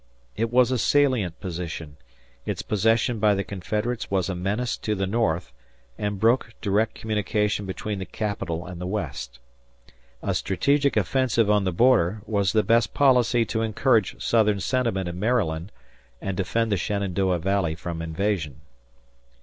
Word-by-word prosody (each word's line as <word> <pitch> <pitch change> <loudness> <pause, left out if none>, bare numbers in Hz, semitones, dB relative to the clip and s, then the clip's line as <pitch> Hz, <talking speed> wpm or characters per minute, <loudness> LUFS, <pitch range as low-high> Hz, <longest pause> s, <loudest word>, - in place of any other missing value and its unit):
It 115 +1 -1
was 125 0 +4
a 130 - +1
salient 125 - +2
position; 85 -5 -6 0.5
its - - -3
possession 115 +2 +1
by 105 -1 +4
the 100 - -1
Confederates 105 +5 -3
was 95 -2 0
a 95 - -2
menace 105 +7 -1
to 105 - -2
the 95 -1 -1
North 90 - -1 0.4
and 105 +3 -3
broke 115 +1 +2
direct 105 +2 0
communication 105 -2 -1
between 100 +2 -4
the 95 - -4
Capital 90 -5 -3
and 90 -1 -8
the 90 - -3
West. 70 -11 -4 0.9
A - - 0
strategic 140 -2 +1
offensive 115 +1 +2
on 105 -2 +3
the 95 - +1
border 105 -2 +3
was 100 -3 +1
the 110 +1 +3
best 115 -2 +2
policy 125 -4 +4
to 110 - -2
encourage 110 -1 +1
Southern 105 -3 +2
sentiment 115 -5 0
in 85 +1 -5
Maryland 100 -6 0 0.5
and 95 -1 -3
defend 110 +4 0
the 100 - +2
Shenandoah 95 -2 0
Valley 90 -2 0
from 85 0 -5
invasion. 80 -4 -2
105 Hz, 150 wpm, -25 LUFS, 90-115 Hz, 0.9 s, was